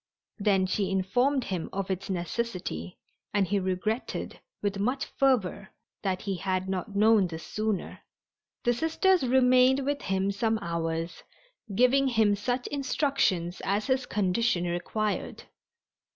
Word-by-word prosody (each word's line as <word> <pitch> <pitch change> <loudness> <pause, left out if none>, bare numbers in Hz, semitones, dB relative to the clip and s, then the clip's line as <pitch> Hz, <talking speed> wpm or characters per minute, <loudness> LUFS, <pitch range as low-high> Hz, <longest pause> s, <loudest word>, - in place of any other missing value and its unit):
Then 200 -2 +3
she 190 +1 0
informed 245 +9 +1
him 185 -6 -3
of 195 0 -3
its 190 +2 -4
necessity, 175 - -3 0.4
and 200 -1 +3
he 200 +2 0
regretted, 190 +5 -2 0.2
with 200 -1 -2
much 250 +7 0
fervor, 230 -8 +1 0.3
that 190 -2 -2
he 195 -2 -2
had 185 +1 -1
not 190 +2 -3
known 210 -2 +5
this 160 -1 -7
sooner. 215 -3 -2 0.6
The 240 - +3
Sisters 325 +7 +2
remained 255 +1 +4
with 285 0 -1
him 190 +1 0
some 220 +3 0
hours, 165 -1 -3 0.5
giving 260 +4 +4
him 220 -5 +3
such 245 +5 -2
instructions 270 - 0
as 200 +2 0
his 260 -1 0
condition 200 -1 +1
required. 200 +5 -2
205 Hz, 130 wpm, -28 LUFS, 185-245 Hz, 0.6 s, known